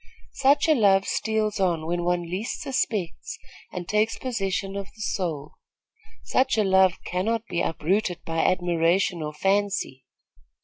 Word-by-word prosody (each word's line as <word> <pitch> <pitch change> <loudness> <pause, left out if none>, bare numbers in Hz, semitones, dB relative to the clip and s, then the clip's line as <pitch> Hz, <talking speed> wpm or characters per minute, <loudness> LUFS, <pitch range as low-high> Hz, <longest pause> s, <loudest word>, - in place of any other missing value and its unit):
Such 280 +3 +3
a 315 - +6
love 200 -6 +4
steals 220 -1 -1
on 170 -4 +1
when 175 +1 -1
one 175 0 0
least 185 +7 -4
suspects 220 - -2 0.3
and 175 -1 -6
takes 210 +2 +1
possession 195 -5 -2
of 200 -1 -4
the 215 - -11
soul. 165 -9 -3 0.7
Such 255 -3 +1
a 215 - +4
love 190 -2 +4
cannot 220 +5 -1
be 170 - -1
uprooted 175 +3 -1
by 165 0 -2
admiration 175 0 +1
or 150 -1 -3
fancy. 195 -6 -1
190 Hz, 140 wpm, -25 LUFS, 175-215 Hz, 0.7 s, a